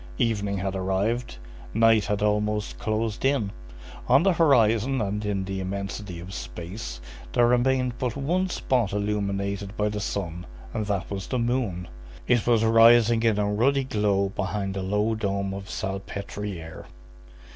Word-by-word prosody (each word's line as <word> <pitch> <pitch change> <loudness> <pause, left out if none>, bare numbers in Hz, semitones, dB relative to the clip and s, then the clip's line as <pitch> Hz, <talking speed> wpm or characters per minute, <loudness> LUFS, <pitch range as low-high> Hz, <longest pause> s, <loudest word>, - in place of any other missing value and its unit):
Evening 105 -3 0
had 95 +1 -2
arrived, 95 - -1 0.4
night 115 -2 +5
had 105 0 -1
almost 105 0 0
closed 110 0 -2
in; 135 -7 +1 0.6
on 135 +5 +5
the 195 -1 +4
horizon 130 -5 +3
and 105 0 -2
in 100 -2 -1
the 95 0 -4
immensity 95 -1 -5
of 90 +3 -9
space, 85 - -6 0.3
there 120 - +4
remained 125 +1 +2
but 125 -3 -1
one 175 +7 0
spot 125 - 0
illuminated 100 0 -2
by 105 0 +1
the 105 0 -3
sun, 90 -4 -4 0.3
and 110 -2 -2
that 100 -2 -2
was 95 -2 -4
the 130 - -1
moon. 115 -7 -1 0.4
It 120 -2 +2
was 115 -2 +4
rising 115 0 +6
in 115 -2 +2
a 105 - +1
ruddy 135 +6 +2
glow 105 -5 +1
behind 95 0 -3
the 95 - -3
low 105 +4 0
dome 100 -2 -2
of 100 0 -6
Salpêtrière. 95 -3 -5
105 Hz, 150 wpm, -26 LUFS, 100-115 Hz, 0.6 s, rising